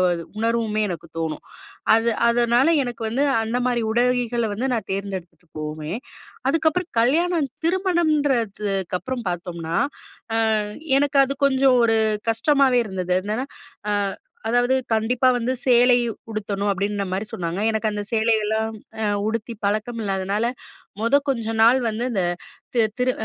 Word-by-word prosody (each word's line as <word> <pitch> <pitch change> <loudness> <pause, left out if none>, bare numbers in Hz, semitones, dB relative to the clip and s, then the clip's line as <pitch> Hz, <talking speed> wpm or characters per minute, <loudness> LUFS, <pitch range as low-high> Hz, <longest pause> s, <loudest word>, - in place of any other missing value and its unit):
ஒரு 170 -1 -2 0.2
உணர்வுமே 225 -1 0
எனக்கு 170 -1 -5
தோணும். 160 -2 -3 0.5
அது 225 +1 +2 0.2
அதனால 240 +4 +3 0.2
எனக்கு 240 -2 -6
வந்து 265 +6 +1 0.2
அந்த 235 +3 -1
மாரி 240 -2 +1
உடைகள 240 0 +1
வந்து 250 +6 -2
நான் 225 - -3
தேர்ந்தெடுத்துட்டுபோவுமே! 170 -5 -5 0.5
அதுக்கப்புறம் 325 +3 +1
கல்யாணம் 315 +4 +2 0.2
திருமணம்ன்றதுக்கு 285 - 0
அப்புறம் 255 -5 -5
பார்த்தோம்ன்னா, 170 -1 -4 0.8
அ - - +1 0.4
எனக்கு 285 -1 +2
அது 275 +1 -3
கொஞ்சம் 265 -1 +4
ஒரு 225 -1 +3 0.3
கஷ்டமாவே 270 +1 +3
இருந்தது. 185 -2 -2
என்னன்னா 220 +6 -2 0.4
அ - - +1 0.6
அதாவது, 245 +2 +3 0.2
"கண்டிப்பா 235 +4 +2
வந்து 245 +2 -1
சேலை 245 0 +6 0.4
உடுத்தணும்." 205 -1 -2
அப்பிடின்ற 200 +1 -1
மாரி 195 +3 -2
சொன்னாங்க. 175 +3 -3
எனக்கு 220 0 0
அந்த 205 0 -3
சேலையெல்லாம் 220 0 +1 0.3
அ - - +1 0.2
உடுத்தி 230 +1 -3
பழக்கம் 215 +3 -1
இல்லாதனால, 195 +2 -1 0.5
முத 230 +5 +2
கொஞ்ச 230 -4 -1
நாள் 240 +4 +6
வந்து 220 +2 -2
இந்த 190 -5 0 0.5
தி 235 - +3 0.2
திரு 250 0 +2
230 Hz, 130 wpm, -23 LUFS, 200-250 Hz, 0.8 s, சேலை